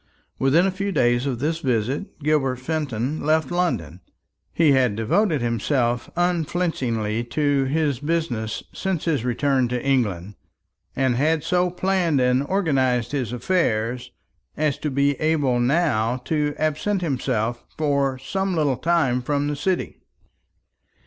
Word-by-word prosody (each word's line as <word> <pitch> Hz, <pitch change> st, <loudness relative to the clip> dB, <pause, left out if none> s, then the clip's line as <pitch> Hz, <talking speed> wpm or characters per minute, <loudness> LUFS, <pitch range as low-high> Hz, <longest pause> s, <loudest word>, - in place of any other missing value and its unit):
Within 145 Hz, +7 st, +4 dB
a 195 Hz, -, +1 dB
few 195 Hz, +2 st, -3 dB
days 120 Hz, -4 st, +2 dB
of 130 Hz, -3 st, -1 dB
this 155 Hz, +6 st, -1 dB
visit 130 Hz, -, -2 dB
Gilbert 145 Hz, -3 st, +1 dB
Fenton 135 Hz, -1 st, -3 dB
left 155 Hz, -1 st, +1 dB
London. 95 Hz, -, -1 dB, 0.5 s
He 160 Hz, -3 st, +3 dB
had 130 Hz, -6 st, +3 dB
devoted 150 Hz, -, +1 dB
himself 120 Hz, +1 st, 0 dB
unflinchingly 160 Hz, -11 st, -1 dB
to 145 Hz, +1 st, +1 dB
his 145 Hz, -2 st, 0 dB
business 145 Hz, -8 st, -2 dB
since 190 Hz, -5 st, -2 dB
his 150 Hz, -8 st, 0 dB
return 130 Hz, +1 st, +1 dB
to 125 Hz, 0 st, -3 dB
England, 105 Hz, -9 st, 0 dB, 0.6 s
and 130 Hz, -2 st, +1 dB
had 155 Hz, +3 st, +1 dB
so 180 Hz, +2 st, +1 dB
planned 180 Hz, -4 st, +1 dB
and 125 Hz, +1 st, +3 dB
organized 135 Hz, -, +1 dB
his 130 Hz, -6 st, -2 dB
affairs 120 Hz, -5 st, 0 dB, 0.5 s
as 150 Hz, -2 st, 0 dB
to 150 Hz, -, -2 dB
be 140 Hz, 0 st, +1 dB
able 145 Hz, -6 st, +2 dB
now 125 Hz, -4 st, +1 dB
to 150 Hz, -2 st, 0 dB
absent 155 Hz, +6 st, -1 dB
himself 120 Hz, -5 st, -1 dB
for 140 Hz, -3 st, +1 dB
some 190 Hz, +8 st, -2 dB
little 145 Hz, -5 st, +1 dB
time 160 Hz, -7 st, +1 dB
from 145 Hz, +2 st, -1 dB
the 150 Hz, -, -1 dB
City. 185 Hz, +5 st, -2 dB
140 Hz, 135 wpm, -23 LUFS, 125-160 Hz, 0.6 s, Within